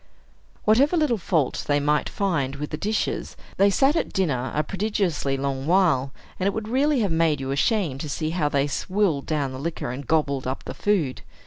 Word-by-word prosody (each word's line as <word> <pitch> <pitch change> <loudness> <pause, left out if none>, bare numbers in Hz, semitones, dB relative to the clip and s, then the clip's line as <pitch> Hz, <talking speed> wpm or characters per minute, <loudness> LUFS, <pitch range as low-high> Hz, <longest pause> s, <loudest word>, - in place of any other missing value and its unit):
Whatever 275 +11 +4
little 285 -9 +2
fault 160 -6 0
they 145 0 +3
might 150 +1 +1
find 145 -9 -1
with 150 +1 -5
the - - -1
dishes, 210 +6 -2 0.2
they 200 +1 +5
sat 270 - +3
at - - -1
dinner 130 - 0
a 150 - +2
prodigiously 190 -7 -1
long 135 0 -2
while; 165 -8 +3 0.3
and 190 - +1
it 200 - 0
would 220 -1 -3
really 270 +3 +2
have 200 -5 0
made 160 -3 +2
you 135 0 -3
ashamed 140 - 0
to 155 - -5
see 155 +2 -2
how 160 -4 0
they 140 -1 +1
swilled 175 0 0
down 145 -4 -1
the 130 - -7
liquor 155 -4 -3
and 130 +1 -7
gobbled 140 -5 +1
up 130 - -3
the - - -6
food. 175 -11 0
160 Hz, 200 wpm, -24 LUFS, 140-200 Hz, 0.3 s, they